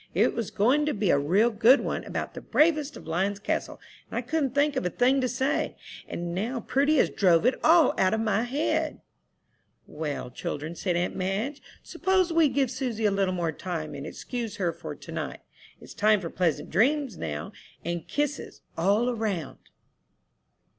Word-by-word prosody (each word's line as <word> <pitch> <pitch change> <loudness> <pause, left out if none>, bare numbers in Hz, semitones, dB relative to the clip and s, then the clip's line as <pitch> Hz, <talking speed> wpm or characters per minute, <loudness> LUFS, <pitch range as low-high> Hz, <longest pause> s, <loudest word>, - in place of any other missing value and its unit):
It - - +3
was 230 -4 -3
going 260 +9 +2
to 300 - 0
be 200 -3 +2
a 140 - +4
real 195 +11 +3
good 230 +5 +6
one, - - -3
about - - -4
'The - - -7
Bravest 300 -2 +2
of - - -12
Lion's 190 +5 0
Castle,' 205 - -3 0.3
and - - -4
I - - -1
couldn't 285 -5 -1
think 285 0 +2
of 260 - 0
a 180 - 0
thing 255 +7 +2
to 255 - +1
say, 260 +3 -1 0.3
and 170 0 -4
now 230 +7 -2
Prudy 285 +6 +2
has - - +3
drove 180 -2 +3
it 255 - +5
all 325 -3 +6
out 190 +3 +3
of - - -2
my 220 -1 +1
head." 310 +5 -1 0.8
"Well, 145 -5 -5
children," 150 +6 -5
said 175 +1 -2
aunt 175 +1 -1
Madge, 205 +10 -2 0.2
"suppose 375 -2 +1
we 325 -3 +5
give 265 -1 +1
Susy 245 -4 -2
a 205 - +4
little 195 -2 +1
more 170 -2 -1
time, 160 -1 -5
and 140 +2 -6
excuse 230 +3 -5
her 180 -5 -1
for - - -7
to - - -11
night? - - -5 0.4
It's - - -12
time 215 0 +3
for 170 -4 -6
pleasant 170 -5 -1
dreams 265 - +2
now, 75 - -5 0.3
and 170 0 -3
kisses 290 -1 -3
all 205 +8 +2
'round." 205 - -3
220 Hz, 185 wpm, -27 LUFS, 180-275 Hz, 0.8 s, good